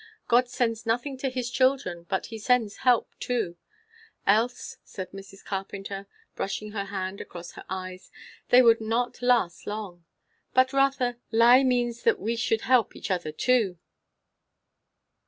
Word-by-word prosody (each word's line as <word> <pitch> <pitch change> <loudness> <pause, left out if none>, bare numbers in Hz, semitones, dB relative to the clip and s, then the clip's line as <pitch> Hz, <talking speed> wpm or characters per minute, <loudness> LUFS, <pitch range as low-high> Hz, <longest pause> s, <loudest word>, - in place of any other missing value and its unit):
God 245 +1 +4
sends 230 -2 -1
nothing 245 +5 0
to 270 - -1
his 250 -1 -3
children 255 -11 +1
but 190 - -1
he 225 0 -8
sends 225 -2 +1
help 250 -3 +2
too; 230 -9 -2 0.7
else," 230 +5 +1
said 185 -1 -8
Mrs. 195 0 -12
Carpenter, 195 0 -5 0.3
brushing 210 +2 -4
her 200 -2 -3
hand 195 0 -4
across 175 -1 -9
her - - -11
eyes, 185 -1 -6 0.4
"they 250 +1 +7
would 230 -1 +5
not 230 +3 -1
last 240 -9 +1
long! 205 -5 -6 0.5
But, 260 +1 +4
Rotha, 275 -3 +2
lie 235 +3 +7
means 240 -2 +1
that - - +2
we 225 +5 -1
should 230 -1 0
help 250 -3 +2
each - - -5
other 175 -4 -1
too." 215 0 +1
225 Hz, 145 wpm, -27 LUFS, 195-250 Hz, 0.7 s, they